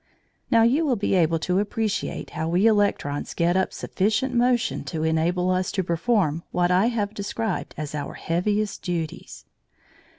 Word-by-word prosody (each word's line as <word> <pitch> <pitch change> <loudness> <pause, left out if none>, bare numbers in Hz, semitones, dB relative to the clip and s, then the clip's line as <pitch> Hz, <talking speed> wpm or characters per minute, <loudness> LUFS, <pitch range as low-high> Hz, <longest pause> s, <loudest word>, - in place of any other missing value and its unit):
Now 230 -3 +5
you 265 +8 +3
will 275 -5 +2
be 205 -2 -1
able 165 -3 +3
to 180 +3 0
appreciate 210 +1 -2
how 160 - -3
we 180 +5 +2
electrons 205 -10 +1
get 170 +1 +2
up 190 0 +1
sufficient 220 +7 -1
motion 245 0 +1
to 160 -3 -3
enable 170 +3 +1
us 185 0 0
to 190 - 0
perform 170 -2 +1
what 175 0 +1
I 185 +5 +4
have 215 -4 -1
described 210 0 -3
as 150 -1 -5
our 145 -2 -4
heaviest 205 +5 -1
duties. 170 -3 -5
185 Hz, 160 wpm, -24 LUFS, 170-220 Hz, -, Now